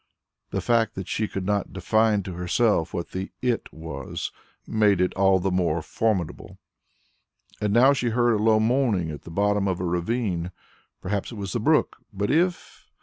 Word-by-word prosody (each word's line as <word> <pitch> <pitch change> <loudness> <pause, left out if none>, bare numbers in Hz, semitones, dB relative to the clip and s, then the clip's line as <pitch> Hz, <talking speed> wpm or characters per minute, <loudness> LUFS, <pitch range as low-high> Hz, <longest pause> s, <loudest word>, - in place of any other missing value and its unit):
The - - -2
fact 115 -1 +1
that 95 -1 -5
she 110 - -1
could 95 -2 -5
not 100 0 -1
define 105 +2 +2
to 95 - -6
herself 90 0 +1
what 85 - -5
the 95 +1 -4
"it" 125 -2 -1
was, 70 -4 -6 0.3
made 105 -4 +2
it 90 0 +1
all 95 -1 +4
the 95 +1 -1
more 85 -3 0
formidable. 95 -3 -2 1.0
And 105 -1 +1
now 125 +6 +6
she 125 -3 0
heard 120 +1 +2
a 105 - 0
low 110 -1 +4
moaning 110 - +1
at 75 - -8
the - - -9
bottom 100 +3 +1
of 95 -2 0
the 90 - -4
ravine. 90 0 -1 0.5
Perhaps 100 +4 -2
it - - -8
was 100 -3 -5
the - - 0
brook, - - +2
but 100 +1 -1
if...? 175 +3 -1
100 Hz, 180 wpm, -25 LUFS, 90-115 Hz, 1.0 s, now